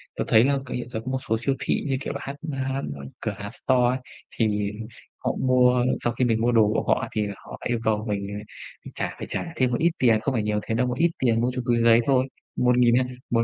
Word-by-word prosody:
tớ - - -1
thấy 110 - +6
là 140 0 +2
cái 125 - -4
hiện 120 -1 -6
giờ 110 - -4
có 130 - -3
một 130 - 0
số 110 - +2
siêu 135 +2 +1
thị 135 - 0
như 135 -1 0
kiểu - - -4
là 140 - -5
hát 140 - -5 0.2
hát, 135 0 -2
ơ, 70 - -9 0.2
cửa 110 - -2
hàng, 105 0 -6
store, 125 0 +1 0.4
thì 105 -2 +1 0.5
họ - - -1
mua 125 -1 +4 0.2
sau 120 - 0
khi 125 +1 +1
mình 115 -2 +1
mua 120 +1 +3
đồ 110 -3 +5
của - - 0
họ - - +2
thì 105 -1 0
là 100 - -5
họ - - -11
yêu 120 -1 0
cầu 110 -1 0
mình 100 -1 -2 0.7
trả - - -3
phải - - -5
trả 170 - -3
thêm 130 -1 +2
một 120 - +1
ít 170 +1 +3
tiền, 115 -4 +4
không 135 - -1
phải 115 -4 0
nhiều 105 0 0
thế 110 - -2
đâu, 125 +2 +1
một 125 0 -2
ít 170 +3 +3
tiền 115 -3 +2
mua 125 +1 +1
cho 125 - -1
túi 120 -1 +2
giấy 115 0 +6
thôi, 130 -1 +3 0.3
1.200, 125 0 +4 0.2
một 115 -1 +2
120 Hz, 260 wpm, -25 LUFS, 110-130 Hz, 0.7 s, thấy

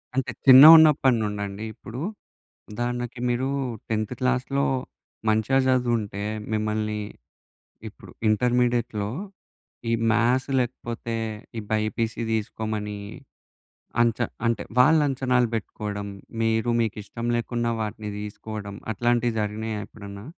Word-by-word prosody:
అంటే, 135 -1 0
చిన్నగున్నప్పడి 145 -1 +9
నుండండి 100 0 -4
ఇప్పుడూ? 110 +4 -9 0.7
ఉదాహరణకి 120 +2 -3
మీరూ 125 +2 0 0.4
10థ్ 110 +1 -1
క్లాస్‌‌‌‌‌‌‌‌‌‌‌‌‌‌‌‌‌‌‌‌‌‌‌లో 130 +2 +1 0.6
మంచిగా 110 +5 +2
జదువుంటే, 120 -6 0 0.3
మిమ్మల్నీ, 105 0 -1 0.9
ఇప్పుడు - - -15 0.2
ఇంటర్మీడియట్‌‌‌‌లో 120 -2 +1 0.8
ఈ - - +2 0.2
మ్యాథ్స్ 120 +4 +2
లేకపోతే, 120 -2 -4 0.4
ఈ - - -1
బైపీసీ 110 +1 -1
తీసుకోమనీ 105 -1 -3 1.0
అంచ 115 -2 +1 0.3
అంటే, 115 - 0 0.2
వాళ్ళంచనాలు 130 -4 +3
బెట్టుకోడం, 105 -1 -5 0.4
మీరు 115 +1 +1
మీకిష్టం 110 +2 -4
లేకున్నా 120 0 -1
వాటిని 105 0 -5
తీసుకోడం, 105 -1 -7 0.2
అట్లాంటియి 120 +1 +1
జరిగినాయా 105 +1 -3
ఎప్పుడన్నా? 100 -1 -10
115 Hz, 90 wpm, -25 LUFS, 105-125 Hz, 1.0 s, చిన్నగున్నప్పడి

